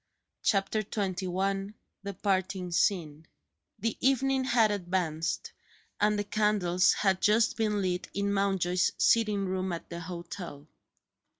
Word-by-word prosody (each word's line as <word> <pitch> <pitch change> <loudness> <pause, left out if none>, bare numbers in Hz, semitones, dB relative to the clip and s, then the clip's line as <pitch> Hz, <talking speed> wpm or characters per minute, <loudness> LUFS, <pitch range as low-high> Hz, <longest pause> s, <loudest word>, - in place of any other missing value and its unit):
CHAPTER 200 +1 +1
XXI 195 0 -2 0.3
THE 200 -1 -6
PARTING 190 -2 -1
SCENE 160 -4 0 0.5
THE 230 0 -2
evening 265 0 +2
had 230 -4 +3
advanced, 175 -4 -2 0.5
and 210 0 +3
the 205 - 0
candles 205 -3 +2
had 190 -2 +1
just 220 +2 +3
been 210 -3 0
lit 180 -1 -1
in 200 0 0
Mountjoy's 190 -3 +1
sitting 210 -3 +3
room 185 0 -2
at 170 0 -6
the 170 - -5
hotel. 170 -3 -7
195 Hz, 120 wpm, -29 LUFS, 180-210 Hz, 0.5 s, had